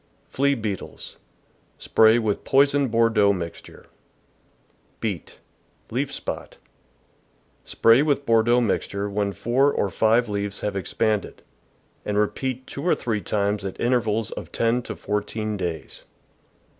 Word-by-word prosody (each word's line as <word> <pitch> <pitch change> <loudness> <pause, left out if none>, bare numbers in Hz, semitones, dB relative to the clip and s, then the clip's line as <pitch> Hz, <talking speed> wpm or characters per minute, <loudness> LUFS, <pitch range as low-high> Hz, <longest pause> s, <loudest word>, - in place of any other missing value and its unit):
Flea 140 +1 +1
Beetles. 105 -5 -6 0.3
— - - -38
Spray 110 +1 +6
with 110 -3 -1
poisoned 140 0 +3
Bordeaux 115 -3 +3
mixture. 85 -3 -8 1.1
Beet. 100 -8 -4 0.3
— - - -34
Leaf - - -1
Spot. - - -6 0.6
— - - -39
Spray 115 +3 +5
with 145 -2 +1
Bordeaux 115 +2 +4
mix 110 -5 0
ture 100 +1 -3
when 100 0 -1
four 130 +7 +2
or 100 - -1
five 115 +5 +3
leaves 100 -1 -3
have 105 -1 -2
expanded, 105 +3 -1 0.6
and 105 0 -2
repeat 130 +5 -1
two 140 - -7
or 175 - +3
three 110 -4 -2
times 100 +2 -1
at 95 -1 -6
intervals 115 -3 0
of - - -7
ten 115 +2 +1
to - - -7
four 105 0 -1
teen 110 0 -4
days. 85 -5 -5
110 Hz, 140 wpm, -24 LUFS, 100-120 Hz, 1.1 s, Spray